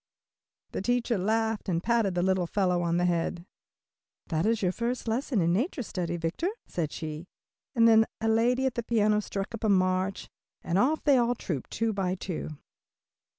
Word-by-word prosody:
The - - -3
teacher 240 0 0
laughed 220 +1 0
and 170 -1 0
patted 225 -5 +1
the 175 - +1
little 185 -2 +1
fellow 180 -2 +1
on 170 0 +1
the 175 - +2
head. 170 0 -1 0.8
"That 165 +4 +1
is 225 -2 +1
your 180 - +2
first 240 +4 -3
lesson 230 -1 0
in 170 +1 +2
nature 255 - -1
study, 175 -4 -3
Victor," 165 - -1 0.2
said 160 -4 -3
she, 155 +2 -6 0.5
and 230 -1 +6
then 225 -1 +6
a 225 - -1
lady 240 +4 +2
at 260 - +1
the 235 - -2
piano 215 -2 +2
struck 200 +1 -5
up 230 - -6
a 215 - +2
march 185 0 +1 0.4
and 175 +3 +1
off 295 +8 +2
they 285 -3 +5
all 240 0 +2
trooped 155 - -4
two 225 -1 -1
by 190 -2 -1
two. 180 -3 -5
200 Hz, 185 wpm, -28 LUFS, 180-230 Hz, 0.8 s, and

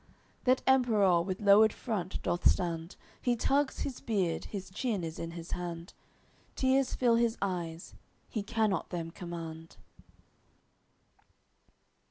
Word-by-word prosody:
That 255 0 +3
Emperour 215 -9 +4
with 185 +3 -4
lowered 210 +2 +7
front 200 -7 -4
doth 175 - +3
stand, 170 -1 -1 0.3
He 245 -1 +2
tugs 275 +4 +1
his 265 - -3
beard, 190 -7 -1
his 190 -3 -7
chin 210 -2 -2
is 160 -1 -5
in 165 - -4
his 170 0 -8
hand 175 0 -5 0.6
Tears 265 0 +2
fill 235 -2 +3
his 235 -1 +1
eyes, 175 -4 -3 0.3
he 220 - -3
cannot 210 -1 0
them 165 -2 -4
command. 165 -2 -8
195 Hz, 125 wpm, -31 LUFS, 170-230 Hz, 0.6 s, lowered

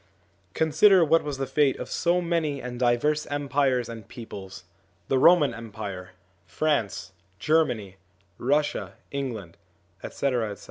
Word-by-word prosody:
Consider 165 +4 +5
what 165 +2 +3
was 145 -2 -4
the 135 - -2
fate 140 -1 +2
of - - -6
so 175 +1 +1
many 165 -5 -1
and 125 -1 -7
diverse 130 +5 +1
empires 140 -4 0
and 115 -3 -9
peoples: 95 -6 -9 0.5
the 135 - +2
Roman 150 -5 +5
Empire, 100 -5 -7 0.3
France, 115 - -1 0.3
Germany, 120 - 0 0.4
Russia, 135 -8 0 0.2
England, 115 -11 -5 0.4
etc. 120 -7 -2
135 Hz, 120 wpm, -26 LUFS, 110-150 Hz, 0.5 s, Consider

